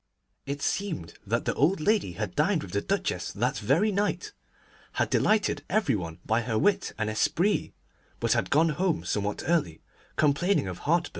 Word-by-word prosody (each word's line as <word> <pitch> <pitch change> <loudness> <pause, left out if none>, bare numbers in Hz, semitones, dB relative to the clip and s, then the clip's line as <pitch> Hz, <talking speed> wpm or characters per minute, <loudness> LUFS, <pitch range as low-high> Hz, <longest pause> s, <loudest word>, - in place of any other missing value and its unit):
It 140 +1 -4
seemed 175 - -2
that 115 +3 0
the - - +1
old 165 +7 +2
lady 200 - +1
had 105 0 -4
dined 160 +3 +1
with 90 - -9
the 100 +2 0
Duchess - - -1
that - - -1
very 155 - +2
night, 205 - -1 0.6
had - - 0
delighted 215 -1 +2
every 210 -10 +2
one 85 -5 -4
by 110 +2 +2
her 115 -2 -1
wit 205 - +2
and 110 0 -1
esprit, 170 - +1 0.5
but - - +2
had - - 0
gone 160 +3 +4
home 165 +2 0
somewhat 105 0 -2
early, 155 - +1 0.4
complaining 155 - +2
of 90 -1 -5
heartburn. 170 +3 +1
150 Hz, 170 wpm, -27 LUFS, -, 0.6 s, gone